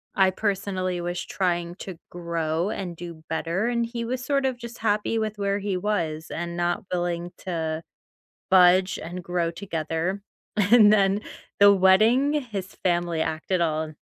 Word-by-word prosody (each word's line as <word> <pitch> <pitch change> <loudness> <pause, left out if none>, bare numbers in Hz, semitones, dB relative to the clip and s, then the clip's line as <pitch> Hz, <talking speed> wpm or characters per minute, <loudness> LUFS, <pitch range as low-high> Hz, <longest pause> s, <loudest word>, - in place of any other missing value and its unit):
I 190 -2 +5
personally 190 -3 -2
was 175 0 -3
trying 175 -2 -1
to 185 -4 -7
grow 170 +1 -2
and 180 -5 -4
do 170 -2 -9
better. 170 +7 -1
And 235 -1 0
he 235 0 -4
was 255 +2 -3
sort 275 -1 +1
of 255 -2 0
just 235 -1 -9
happy 215 +1 0
with 215 -1 -3
where 200 0 0
he 200 -2 -2
was 165 -6 -2
and 170 0 -4
not 175 +1 -1
willing 175 0 -2
to 160 -3 -3 0.7
budge 185 0 +5
and 175 +2 -6
grow 175 -1 -1
together. 170 +1 -3 0.3
And 210 +1 +6
then 200 0 +3 0.4
the 200 0 +9
wedding, 215 +9 +4
his 215 -10 -4
family 175 -2 +1
acted 160 +3 -1
all 155 -1 0
185 Hz, 155 wpm, -25 LUFS, 170-205 Hz, 0.7 s, the